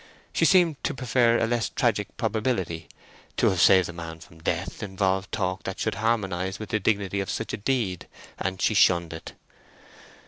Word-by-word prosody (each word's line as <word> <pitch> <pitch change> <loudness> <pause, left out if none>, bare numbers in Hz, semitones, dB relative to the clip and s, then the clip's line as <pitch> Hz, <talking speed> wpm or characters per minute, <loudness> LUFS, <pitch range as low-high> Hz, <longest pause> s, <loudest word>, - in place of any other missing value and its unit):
She - - +3
seemed 175 -6 +4
to - - -1
prefer 120 -2 +3
a - - +2
less 115 0 0
tragic 110 -6 -1
probability; 110 -7 -1 0.5
to - - +4
have 90 -2 0
saved 95 -2 +6
a 85 - -7
man 80 -1 -7
from 80 0 -16
death 85 +3 -2
involved 95 -1 -1
talk 95 0 -1
that 95 - -5
should 110 - 0
harmonise 95 -5 0
with 110 - -7
the 110 - 0
dignity 100 -1 0
of 100 - -3
such 115 -2 -3
a - - -1
deed—and 95 -4 -3
she - - +3
shunned 85 -5 +4
it. 80 - -9
100 Hz, 175 wpm, -26 LUFS, 90-115 Hz, 0.5 s, saved